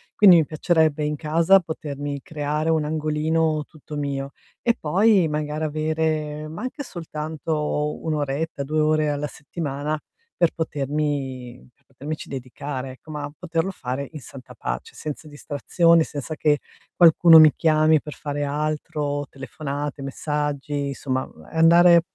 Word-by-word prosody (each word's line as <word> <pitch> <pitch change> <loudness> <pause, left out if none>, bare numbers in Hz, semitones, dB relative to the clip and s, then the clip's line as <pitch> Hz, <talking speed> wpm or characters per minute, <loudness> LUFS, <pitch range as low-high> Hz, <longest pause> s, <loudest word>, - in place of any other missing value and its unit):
Quindi 190 -4 +8
mi 160 - +3
piacerebbe 155 -2 +2
in 150 0 -1
casa 165 +6 +4
potermi 145 -4 -5
creare 150 +1 -1
un 160 -1 +2
angolino 155 0 0
tutto 155 -1 -11
mio 140 -1 -3 0.3
e 235 - +4
poi 190 +3 +3
magari 150 +1 -2
avere 155 0 -1
ma 160 +9 -7
anche 255 +3 -5
soltanto 155 - -3
1 160 -1 -1
oretta, 145 0 -2
2 155 +3 -1
ore 155 0 +2
alla 145 0 -2
settimana 150 0 -4 0.4
per 170 -2 +3
potermi 140 -5 -3
per 140 - -39
potermici 145 +4 -7
dedicare, 130 0 -5
ecco, 145 +4 -13
ma 145 -1 -5
poterlo 170 0 -1
fare 135 -4 -4
in 155 - -8
santa 130 0 -12
pace. - - -5
Senza 155 +1 -6
distrazioni, 160 +3 +2
senza 150 +1 -6
che 150 -1 +2 0.4
qualcuno 165 -1 +8
mi 155 -1 +8
chiami 155 -1 +4
per 150 - -8
fare 145 0 -4
altro, 145 0 -2
telefonate, 140 +2 -5
messaggi, 145 0 -2
insomma, 130 -1 -2
ehm, 80 - -14
andare 170 +1 +6
150 Hz, 140 wpm, -23 LUFS, 145-160 Hz, 0.4 s, Quindi